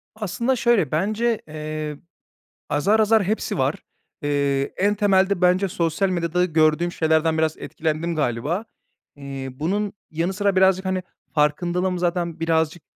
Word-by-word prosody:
Aslında 235 +5 -1
şöyle 230 - +2
bence, 215 +7 0
eee, 155 -1 -5 0.7
azar, 200 +10 +2
azar 220 -1 +4
hepsi 215 +4 -2
var. - - +1 0.5
Eee, 140 -1 0
en 205 +2 +2
temelde 195 -2 +2
bence 180 +2 +3
sosyal 170 +3 0
medyada 180 0 0
gördüğüm 160 0 +2
şeylerden 160 0 +1
biraz 160 0 +1
etkilendim 160 +2 -2
galiba. 150 - -1 0.5
Eee, 135 -1 -6
bunun 195 +9 -2 0.2
yanı 165 +4 -1
sıra 200 -1 0
birazcık, 190 0 +4
hani, 185 -1 -1 0.3
farkındalığım 175 +5 +1
zaten 170 -1 -1
birazcık 160 0 0
175 Hz, 130 wpm, -23 LUFS, 155-195 Hz, 0.7 s, azar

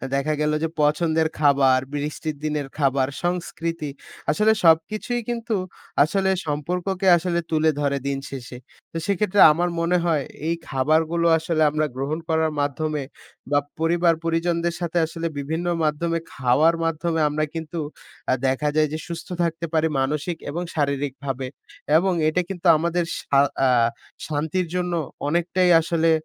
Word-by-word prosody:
দেখা 140 +3 0
গেল 150 0 +2
যে - - +2
পছন্দের 160 +2 +2
খাবার, 140 -3 +4
বৃষ্টির 150 +1 -3
দিনের 150 -2 -2
খাবার, 135 -2 +2 0.2
সংস্কৃতি 165 -3 -2 0.4
আসলে 210 +8 +3
সবকিছুই 215 +9 +2
কিন্তু 235 -1 -2 0.5
আসলে 190 +5 0 0.2
সম্পর্ককে 180 +6 -2
আসলে 170 0 -1
তুলে 160 0 +3
ধরে 140 -1 +1
দিন 140 - -1
শেষে। 125 -2 -8 0.3
তো 165 - -5
সেক্ষেত্রে 200 0 +2
আমার 175 +3 0
মনে 170 +2 +2
হয় 155 -5 +1 0.2
এই 170 - +1
খাবারগুলো 160 +5 +1
আসলে 160 0 -1
আমরা 155 0 +1
গ্রহণ 140 +5 -2
করার 160 0 +2
মাধ্যমে 150 +1 -2 0.5
বা 145 - +5 0.2
পরিবার 170 +1 +3
পরিজনদের 170 +1 0
সাথে 175 -1 -2
আসলে 165 +1 -4
বিভিন্ন 160 +5 -3 0.2
মাধ্যমে 165 +2 0
খাওয়ার 135 +7 +3
মাধ্যমে 165 0 -1
আমরা 155 +1 -1
কিন্তু 165 +1 -5 0.5
আ - - +4
দেখা 140 +3 +1
যায় 155 -1 +4
যে 155 - -1
সুস্থ 170 -1 -6 0.2
থাকতে 170 0 -2
পারি 160 0 +3
মানসিক 150 +5 -1
এবং 170 +4 -3
শারীরিকভাবে 140 -2 -2 0.5
এবং 185 +2 +2
এটা 155 +4 +2
কিন্তু 185 -1 -3
আমাদের 170 +2 0 0.2
শা 140 - +2 0.3
আ - - +5 0.6
শান্তির 160 +4 -1
জন্য 180 -1 -1 0.3
অনেকটাই 175 +3 +1
আসলে 165 0 +1
160 Hz, 140 wpm, -23 LUFS, 145-170 Hz, 0.6 s, বা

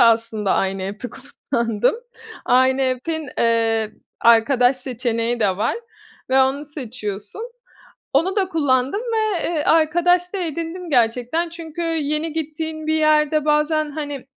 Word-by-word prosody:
aslında 225 -3 +3
aynı 190 0 -1
app'i 205 +6 -5
kullandım. 230 - -1 0.5
Aynı 260 +1 +3
app'in 275 +4 -2
eee, 225 -2 +2 0.3
arkadaş 245 +3 +4
seçeneği 240 -2 -2
de 195 -4 +2
var 210 - 0 0.5
ve 265 +1 +5
onu 275 +3 -1
seçiyorsun. 235 - -6 0.7
Onu 340 +9 +1
da 385 -3 +1
kullandım 280 0 +1
ve, 435 -6 -1
eee, 325 -3 0
arkadaş 345 +3 +3
da - - -1
edindim 335 +1 -4
gerçekten. 250 +6 +1
Çünkü 330 0 -7
yeni 315 -1 -1
gittiğin 315 0 -4
bir 315 - +1
yerde 305 -1 +3
bazen, 300 0 +1
hani, 290 -3 -6
285 Hz, 125 wpm, -21 LUFS, 235-320 Hz, 0.7 s, ve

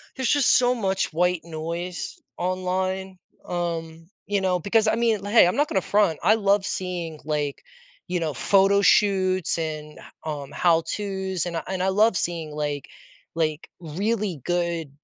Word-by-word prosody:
there's 260 -2 -1
just 285 -3 +4
so 250 0 +3
much 195 -5 -1
white 180 0 +1
noise 170 +2 -5 0.2
online, 185 +1 -2 0.3
um, 165 -2 -4 0.2
you 200 -1 +1
know, 180 -1 +1
because 215 +4 +2
I 220 - +3
mean, 225 -4 +1
hey, 205 -1 +6
I'm 180 - 0
not 295 +1 +3
gonna 190 - 0
front. 200 -6 +2
I 215 - +5
love 200 -2 +2
seeing 175 -5 -4
like, 150 -2 -2 0.5
you 180 -1 -1
know, 155 -3 -1
photo 200 +7 +3
shoots 185 -3 +3
and 155 -2 -5 0.3
um, 145 -3 -5
how-tos 190 +2 0
and 170 -1 -3
I - - -3
and 185 -1 -2
I 190 - +2
love 210 +2 +3
seeing 165 -3 -2
like, 145 -2 -3 0.5
like, 155 -1 -1
really 195 - -2
good, 170 -3 -1
180 Hz, 155 wpm, -24 LUFS, 165-200 Hz, 0.5 s, hey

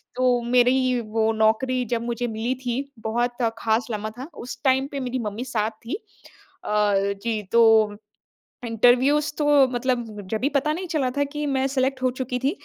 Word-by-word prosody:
तो 250 -1 +2
मेरी 250 0 +3
वो 220 +1 +1
नौकरी 225 +4 +2
जब 230 - -2
मुझे 240 0 -2
मिली 225 +3 -2
थी 240 +2 -1 0.3
बहुत 240 +2 -1 0.2
ख़ास 225 +2 +1
लम्हा 215 0 -3
था, 275 +5 -7
उस 250 - -8
टाइम 265 +1 +3
पे 280 - -4
मेरी 255 0 -3
मम्मी 220 +5 -6
साथ 220 -3 -1
थी। 240 - -3 0.7
अ, 210 -1 +2 0.3
जी 225 -2 -1
तो 220 -3 +5 0.7
इंटरव्यूज़ 245 +7 +3
तो 300 - 0 0.3
मतलब 245 -1 -1 0.3
जभी 245 +6 0
पता 290 +1 +1
नहीं 365 +2 -5
चला 275 -5 +1
था 285 - +3
कि 295 +1 -4
मैं 270 -1 0
सेलेक्ट 265 0 -1
हो 255 - +4
चुकी 255 -1 -3
थी 270 +3 +1
245 Hz, 170 wpm, -24 LUFS, 225-265 Hz, 0.7 s, तो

